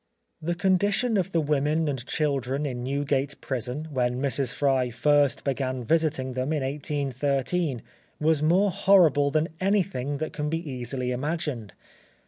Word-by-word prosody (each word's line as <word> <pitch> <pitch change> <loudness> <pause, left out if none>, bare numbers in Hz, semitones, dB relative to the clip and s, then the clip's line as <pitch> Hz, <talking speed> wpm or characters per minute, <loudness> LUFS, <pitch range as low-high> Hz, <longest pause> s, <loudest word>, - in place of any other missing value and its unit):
The 170 +2 -1
condition 200 +6 +1
of 190 -1 0
the 170 - +2
women 150 +1 +1
and 135 -4 -2
children 140 -2 -1
in 125 -3 -4
Newgate 140 +1 -1
Prison, 130 +4 -4
when 125 -2 0
Mrs. 135 -2 +1
Fry 135 -3 +1
first 145 +3 +2
began 130 -2 -2
visiting 150 -2 0
them 130 +3 -2
in 150 -3 -1
1813, 140 +1 -1 0.4
was 155 -1 +2
more 185 +6 +3
horrible 165 -7 +4
than 155 +2 +1
anything 185 -9 0
that 155 +2 -4
can 150 -1 -2
be 165 +1 -3
easily 125 -1 -3
imagined. 130 - -3
145 Hz, 140 wpm, -26 LUFS, 130-160 Hz, 0.4 s, horrible